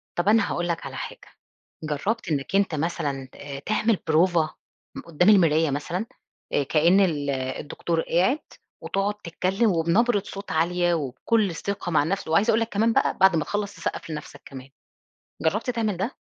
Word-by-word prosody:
طب 175 +2 -1
أنا 220 -1 +3
هاقول 175 0 -1
لك 170 -1 -2
على - - -7
حاجة، - - -7 0.6
جرّبت 170 +8 -2
إنّك 145 +3 -2
أنت 195 -4 +2
مثلًا 145 -4 -2
آآ 140 -1 -7
تعمل 215 +6 +1
بروفة 160 0 +2 0.4
م - - -6
قُدّام 170 +3 +2
المراية 165 -6 +5
مثلًا؟ 175 +8 -3 0.5
آآ 145 - +2
كإن 165 +7 +4
ال 155 -7 +1
الدكتور 140 +5 -2
قاعد 185 - +1 0.4
وتقعد 195 +1 -1
تتكّلم 190 +6 0
وبنبرة 195 +6 +2
صوت 200 +1 -7
عالية 175 +2 +1
وبكل 165 - 0
ثقة 200 +2 -4
مع 155 - +3
النفس، 190 +6 -2
وعايزة 195 +8 +3
أقول 225 - +3
لك 225 0 -1
كمان 225 +2 +2
بقى - - +1
بعد 190 -2 +5
ما 160 - +1
تخلّص، 205 -1 -3
تسقّف - - -4
لنفسك 150 -2 -7
كمان. 130 -1 -10 0.7
جرّبت 205 +10 0
تعمل 220 -5 -1
ده؟ 200 +9 -3
175 Hz, 165 wpm, -25 LUFS, 155-200 Hz, 0.7 s, المراية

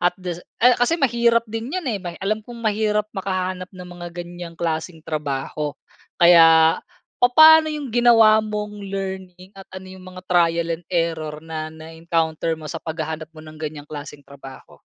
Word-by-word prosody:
At 175 - +1
dasi 180 -2 -6 0.2
ah, 250 - +8
kasi 245 +7 +2
mahirap 235 -5 +2
din 225 - -5
yan, 370 - -4
eh, 205 - -3
may 175 -2 -7
alam 215 +2 0
kong 240 +2 -11
mahirap 215 -2 0
makahanap 185 -2 -3
ng 180 -2 -11
mga 175 - -6
ganyang 175 -1 -8
klaseng 160 0 -4
trabaho. 150 -1 -4 0.4
Kaya 165 -2 +6 0.4
papaano 315 +6 +7
yung 295 -5 -5
ginawa 225 -2 +6
mong 210 -1 -5
learning 190 -1 -6
at 195 -1 -14
ano 185 0 -10
yung 185 -1 -12
mga 185 0 -11
trial 170 -2 +1
and 175 - -32
error 165 -3 -2
na 160 -1 -5
na-encounter 160 0 -3
mo 155 - -12
sa 150 - -6
paghahanap 160 -1 -5
mo 155 -1 -14
ng 155 0 -13
ganyang 150 -2 -6
klaseng 145 -1 -9
trabaho? 135 -1 -14
180 Hz, 165 wpm, -21 LUFS, 160-210 Hz, 0.4 s, ah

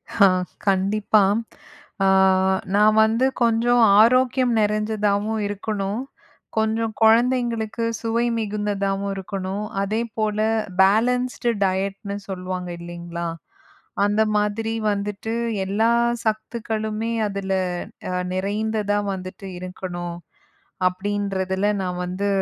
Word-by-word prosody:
ஹ, - - -5 0.5
கண்டிப்பா. 200 +2 +3 0.8
அ - - +4 0.7
நான் 210 +1 +5
வந்து 225 +4 +2 0.2
கொஞ்சம் 235 +1 +3 0.2
ஆரோக்கியம் 255 +2 +4
நிறைஞ்சதாவும் 210 0 0
இருக்கணும். 205 +1 -3 0.6
கொஞ்சம் 220 0 0
கொழந்தைங்களுக்கு 230 0 +2 0.2
சுவை 230 +1 0
மிகுந்ததாவும் 200 -2 -1
இருக்கணும். 195 +1 -4 0.2
அதே 215 +3 0 0.2
போல 215 -1 0 0.4
பேலன்ஸ்டு 240 +4 +2
டயட்னு 195 +1 -1
சொல்லுவாங்க 185 -1 -4
இல்லைங்களா? 170 0 -6 0.8
அந்த 205 +1 +2 0.2
மாதிரி 210 +2 -1 0.2
வந்துட்டு 205 +2 -3 0.3
எல்லா 215 +4 +2 0.3
சத்துக்களுமே 220 0 -2 0.2
அதில 195 -1 -3 0.8
நிறைந்ததா 205 +2 -1 0.2
வந்துட்டு 185 +1 -8
இருக்கணும். 175 -1 -6 0.7
அப்படின்றதில 190 0 -1 0.2
நான் 180 -1 -3
வந்து 185 +3 -2
205 Hz, 85 wpm, -23 LUFS, 195-220 Hz, 0.8 s, நான்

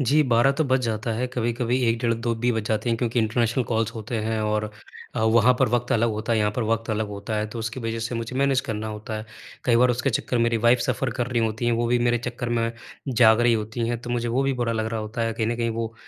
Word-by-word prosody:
जी, 145 +4 +4
12 125 +1 +3
तो 160 - +3
बज 130 -1 +2
जाता 110 0 -2
है, 120 +3 -1
कभी-कभी 120 +1 -1
1, 115 0 +1
डेढ़, 115 -1 +1
2 115 0 -1
भी 125 - +3
बज 110 -2 -1
जाते 110 +2 0
हैं 115 - +1
क्योंकि 120 -1 0
इंटरनेशनल 115 +2 +1
कॉल्स 115 -1 0
होते 115 +1 -4
हैं 110 -1 -1
और 105 0 -1 0.4
अ, - - -1
वहाँ 115 +2 +5
पर - - +3
वक़्त 120 +1 -1
अलग 115 0 +2
होता 110 +2 -2
है, 115 - +2
यहाँ 105 -1 +2
पर 120 - +1
वक़्त 115 0 -1
अलग 110 0 -1
होता 105 +2 -4
है, 105 0 -1
तो 110 +2 -7
उसकी 115 +3 -4
वज़ह 115 0 -3
से 115 +2 -3
मुझे 115 +2 -4
मैनेज 140 -1 +3
करना 110 0 -3
होता 110 +1 -6
है। 110 - -6 0.4
कई 120 -2 +4
बार 125 +1 +5
उसके 130 +3 0
चक्कर 120 +2 -1
मेरी 115 0 +2
वाइफ़ 120 +2 +4
सफ़र 135 -2 -1
कर 120 - 0
रही 120 -2 0
होती 110 +1 -2
हैं, 120 - +3
वो 120 +1 +1
भी 120 +1 +2
मेरे 120 0 +2
चक्कर 120 0 -4
में 115 -1 0 0.4
जाग 115 -2 +5
रहीं 120 -1 +4
होती 110 +2 -3
हैं, 120 -1 -2
तो 120 0 -7
मुझे 120 -1 -1
वो 130 +4 +1
भी 135 - +1
बुरा 115 -1 0
लग 110 -1 -1
रहा 110 - -1
होता 110 +2 -4
है। 115 - 0
कहीं 110 0 -2
न 115 0 -1
कहीं 115 -1 0
वो 115 0 -4
115 Hz, 280 wpm, -24 LUFS, 110-120 Hz, 0.4 s, वहाँ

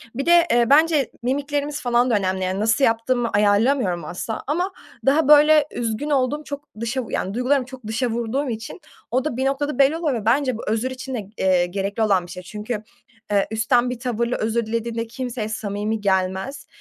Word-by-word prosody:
Bir 275 - -2
de, 345 0 +6
eee, 240 0 +4
bence 300 -2 +4
mimiklerimiz 285 +3 -2
falan 245 0 +2
da 225 - +3
önemli. 190 -1 0
Yani, 185 +2 -1
nasıl 225 +5 +2
yaptığımı 235 +1 +1
ayarlamıyorum 205 - +2
asla 185 +7 -5
ama 355 +7 -1 0.3
daha 285 +2 +3
böyle 300 0 +6
üzgün 240 +5 -3
olduğum, 285 +2 +1
çok 285 -1 -7 0.2
dışa 245 +2 -2
vu - - -11
yani, 190 - -2
duygularımı 255 +2 +1
çok 250 -4 -11
dışa 230 +3 -1
vurduğum 240 +5 -2
için 225 +9 -6 0.3
o 255 +3 +1
da 255 -6 -2
bir 265 - 0
noktada 275 0 -1
belli 280 +4 +4
oluyor 320 -4 0
ve - - -12
bence 255 +1 +2
bu - - -7
özür 225 +4 0
için 260 0 -6
de, 205 -4 -6
eee, 185 -2 +3
gerekli 200 +4 -2
olan 195 -4 +2
bir - - -11
şey. 180 0 -8
Çünkü, 210 +3 -5 0.5
eee, 200 -1 +2
üstten 240 +3 +2
bir 250 -1 -5
tavırla 240 -1 -1
özür 225 +1 -1
dilediğinde 230 +1 -3
kimseye 240 -2 -4
samimi 210 0 -3
gelmez. 190 +6 -1
240 Hz, 195 wpm, -22 LUFS, 215-275 Hz, 0.5 s, de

